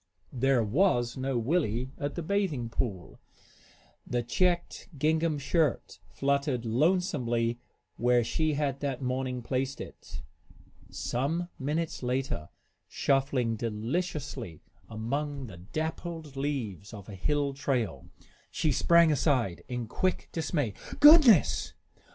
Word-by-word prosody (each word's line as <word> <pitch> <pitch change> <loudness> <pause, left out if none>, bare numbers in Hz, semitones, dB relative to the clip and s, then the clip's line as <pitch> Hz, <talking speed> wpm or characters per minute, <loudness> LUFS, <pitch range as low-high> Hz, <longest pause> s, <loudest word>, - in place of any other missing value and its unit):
There 130 -1 +2
was 120 - +2
no 130 -1 -1
Willie 125 -2 0
at 145 0 -3
the 170 - -3
bathing 160 - -1
pool. 100 -7 -4 0.9
The 120 -1 -1
checked 175 +11 0
gingham 155 +2 +1
shirt 145 0 0
fluttered 140 -3 0
lonesomely 120 - +1 0.4
where 120 0 +3
she 155 +6 0
had 140 -2 -1
that 135 -2 -3
morning 125 -1 -2
placed 130 +2 -2
it. - - -9 0.7
Some 160 +8 -2
minutes 150 +4 -2
later, 125 - -2 0.4
shuffling 135 -4 +1
deliciously 115 - -3 0.3
among 140 +6 -3
the 100 -7 -10
dappled 155 - -5
leaves 120 - -3
of 100 -2 -11
a 105 - -8
hill 140 +9 0
trail, 135 -5 -2 0.4
she 155 - 0
sprang 170 +3 +5
aside 130 - +1
in 125 -1 -3
quick 185 - -1
dismay. 145 - -1 0.3
"Goodness!" 295 - +7
135 Hz, 110 wpm, -29 LUFS, 120-155 Hz, 0.9 s, Goodness